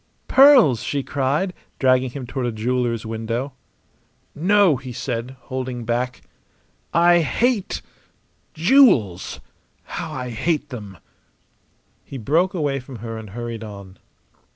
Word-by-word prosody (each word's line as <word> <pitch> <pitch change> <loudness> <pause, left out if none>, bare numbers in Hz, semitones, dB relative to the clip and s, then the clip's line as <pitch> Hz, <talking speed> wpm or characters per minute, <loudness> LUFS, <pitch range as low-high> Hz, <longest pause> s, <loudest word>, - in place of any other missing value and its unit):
"Pearls!" 260 - +6
she 140 -1 -2
cried, 145 +8 -1 0.2
dragging 130 -1 +3
him 130 +1 -7
toward 125 0 -3
a - - -1
jeweller's 115 0 -1
window. 115 +4 -3 0.8
"No!" 185 -1 +3
he 130 -1 -8
said, 120 +1 -4
holding 130 -2 -5
back. 120 +2 -2 0.7
"I 175 +1 +5
hate 220 - 0 0.7
jewels! 160 - +3 0.4
How - - -6
I 125 -1 -5
hate 150 +5 -1
them!" 105 - -8 1.1
He 135 - -8
broke 165 - +1
away 145 -5 -1
from 130 0 -11
her 115 0 -6
and 110 -2 -8
hurried 115 +1 -6
on. 100 -3 -10
130 Hz, 120 wpm, -22 LUFS, 115-155 Hz, 1.1 s, Pearls